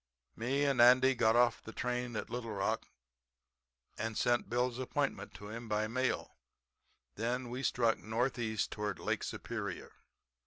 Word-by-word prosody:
"Me 135 +5 0
and 135 -3 +3
Andy 130 +2 +7
got 110 -2 +3
off 120 -1 +4
the 110 - -9
train 125 0 -2
at - - -4
Little 115 -2 -4
Rock 100 -1 -1 1.1
and 110 0 -2
sent 120 0 +2
Bill's 125 +1 0
appointment 140 +2 -2
to 105 - -9
him 115 +1 -7
by 105 +1 +1
mail. 130 +3 -1 0.8
Then 120 +2 -2
we 125 +2 -3
struck 115 -3 +2
northeast 115 -1 -1
toward 105 -2 -3
Lake - - -1
Superior. 100 -6 -5
120 Hz, 145 wpm, -34 LUFS, 110-125 Hz, 1.1 s, Andy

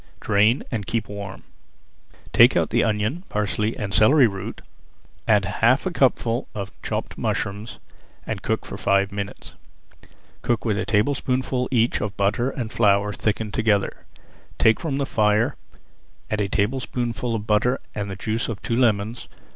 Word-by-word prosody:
Drain 105 +5 +3
and 105 -5 -3
keep 115 -2 -1
warm. 100 -2 -7 0.9
Take - - +7
out - - +1
the - - +3
onion, 110 - -1
parsley 105 +1 -1
and 100 -2 -4
celery 125 +7 +6
root, 100 -4 -4 0.7
add 105 -2 +4
half 115 - +2
a 185 - 0
cupful 125 -6 +1
of 100 -1 -5
chopped - - -4
mushrooms, 100 +3 -3 0.5
and - - -4
cook - - -2
for - - -7
five 100 0 +2
minutes. 100 0 -6 0.9
Cook 120 -1 -1
with 105 -2 +1
a 105 - -3
tablespoonful 125 +3 0
each 120 -2 +2
of 105 -2 -4
butter 105 +6 +1
and 120 -5 -5
flour 105 -2 +2
thickened 105 0 -2
together, 105 -3 0 0.5
take 110 0 +4
from 150 -5 -2
the 140 - 0
fire, 105 -1 +2 0.8
add 105 -1 0
a 100 - -1
tablespoonful 120 +1 -1
of 105 -2 -4
butter 115 +4 +2
and 100 -1 -4
the 95 - -5
juice 110 +4 -2
of 110 -4 -4
two 115 - -1
lemons. 115 -2 +1
110 Hz, 155 wpm, -23 LUFS, 100-120 Hz, 0.9 s, Take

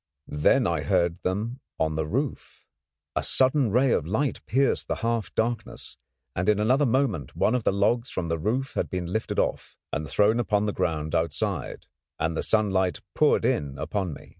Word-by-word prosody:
Then 75 0 +3
I - - 0
heard 85 0 +1
them 110 +7 -2 0.2
on 80 -1 0
the 80 -1 -1
roof. 135 - -4 0.5
A - - +1
sudden 130 -1 +3
ray 125 +3 +3
of 80 - +1
light 135 +10 -1
pierced 135 +2 +1
the - - -1
half 115 -1 -1
darkness, 115 0 -2 0.4
and 90 +3 0
in 105 -1 +3
another 130 +7 +3
moment 115 - 0
one 110 - +2
of 125 -3 -1
the - - +4
logs 110 +5 +1
from 90 -2 -3
the 85 0 -1
roof 125 +10 -1
had - - -1
been 90 -2 -3
lifted 110 - -2
off, - - -1 0.2
and 75 0 -3
thrown 105 - +3
upon 105 -3 +1
the 105 - -1
ground 80 -4 -2
outside, 80 -2 -2 0.3
and 80 0 0
the - - -1
sunlight 95 -5 +1
poured - - +3
in 70 -2 0
upon 95 -5 -2
me. - - -12
105 Hz, 185 wpm, -26 LUFS, 85-120 Hz, 0.5 s, the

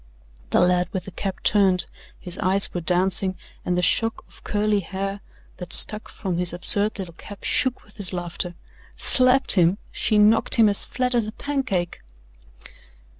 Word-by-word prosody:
The - - +2
lad 180 0 +1
with 185 -2 -4
the 195 - -9
cap 190 +2 -6
turned. 195 -3 +2 0.3
His 180 -1 -7
eyes 195 0 +4
were 175 - -4
dancing 185 +2 0 0.3
and 180 0 -2
the 180 - 0
shock 225 +5 +1
of - - -20
curly 210 0 0
hair 195 +2 -5 0.4
that 180 -2 -7
stuck 215 0 +3
from 185 -4 -5
his 180 -1 0
absurd 200 +4 -1
little 185 -4 -7
cap 200 +4 -13
shook 260 -1 0
with 210 - -22
his 195 -4 -1
laughter. 175 0 -4 0.4
"Slapped 255 +1 +4
him! 180 0 +2
She 215 - 0
knocked 210 +2 +3
him 225 -3 +4
as 200 - +6
flat 250 0 -1
as 235 -3 0
a - - -5
pancake." 220 -10 -4
195 Hz, 170 wpm, -22 LUFS, 180-215 Hz, 0.4 s, as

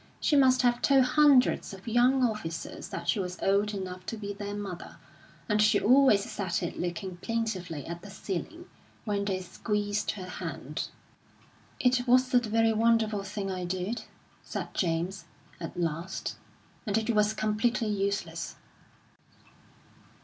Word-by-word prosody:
She 300 - +2
must 260 -2 +5
have 240 0 +3
told 275 -2 +5
hundreds 270 -7 +4
of 190 +3 -15
young 250 +3 +4
officers 210 -9 -3
that 170 0 -6
she 170 - +2
was 180 -1 -3
old 200 +2 +2
enough 185 -1 -5
to 225 - -3
be 205 -1 -5
their 205 0 -5
mother; 195 -4 -6 0.5
and 210 -1 +2
she 210 0 +5
always 255 -4 +5
said 185 -4 -2
it 170 - -4
looking 175 +1 -4
plaintively 185 -8 -3
at 170 +1 -6
the 205 - -10
ceiling, 210 - -5 0.4
when 200 -2 -1
they 190 -2 -1
squeezed 205 +3 -2
her 190 -3 -7
hand. 185 - -5 0.9
"It 250 0 +2
wasn't 250 -1 +4
a - - -7
very 225 +1 +3
wonderful 220 -2 +2
thing 195 0 -4
I 185 -1 -3
did," 185 +6 -3 0.4
said - - -5
James, 170 +1 -1 0.3
at - - -6
last, 170 +2 -2 0.5
"and 205 0 +2
it 225 +1 +1
was 210 -1 +2
completely 220 +2 +1
useless." 200 0 -2
205 Hz, 145 wpm, -29 LUFS, 185-230 Hz, 0.9 s, must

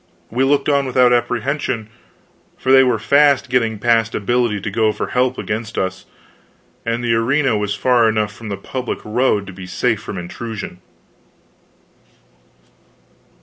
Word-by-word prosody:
We 125 +4 +1
looked 140 +1 +2
on 140 -2 +2
without 125 -1 +4
apprehension, 120 -1 -1 0.7
for 130 - -1
they 135 0 +8
were 125 -3 +2
fast 140 +2 +3
getting 115 -3 +1
past 115 +1 +1
ability 120 0 0
to 105 - -4
go 110 0 +2
for - - -4
help 125 0 +1
against 110 +1 -4
us, 95 0 -3 0.8
and 115 +1 -2
the 115 -1 +1
arena 125 +2 +2
was 105 -1 -1
far 120 -1 +3
enough 105 -2 -1
from 110 0 -9
the 100 - -3
public 125 +5 -4
road 105 -2 +1
to 95 - -9
be 95 0 -9
safe 115 +2 0
from 105 - -7
intrusion. 95 +1 -7
115 Hz, 150 wpm, -19 LUFS, 105-130 Hz, 0.8 s, they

